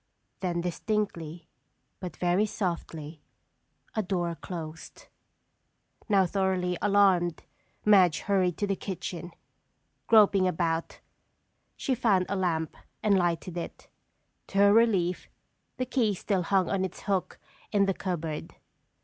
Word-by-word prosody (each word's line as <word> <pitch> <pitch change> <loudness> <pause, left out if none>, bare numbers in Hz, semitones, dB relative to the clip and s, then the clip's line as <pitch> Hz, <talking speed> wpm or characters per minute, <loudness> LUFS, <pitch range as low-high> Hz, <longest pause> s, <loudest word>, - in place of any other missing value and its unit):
Then 175 -2 -1
distinctly, 175 -3 -3 0.5
but 180 -4 -7
very 180 +4 +2
softly, 165 -6 -4 0.7
a 220 - +2
door 175 -3 -1
closed. 160 -2 -8 1.0
Now 195 -2 +5
thoroughly 185 -1 0
alarmed, 195 -5 +3 0.4
Madge 190 -6 +5
hurried 185 -4 +1
to 205 - 0
the 200 -1 0
kitchen. 175 -3 -5 0.8
Groping 200 -4 +6
about, 165 -2 -1 0.8
she 265 - 0
found 210 -7 +2
a 200 - 0
lamp 165 -4 -1 0.3
and 210 -2 +4
lighted 175 -1 0
it. - - -8 0.6
To 195 - -5
her 200 0 +6
relief, 195 -6 +2 0.5
the 255 - -1
key 235 -5 +1
still 195 0 0
hung 185 +1 +2
on 195 -1 0
its 190 -1 -5
hook 195 -3 -1 0.3
in 200 -2 +3
the 195 - +1
cupboard. 165 -5 -4
185 Hz, 120 wpm, -28 LUFS, 170-200 Hz, 1.0 s, Groping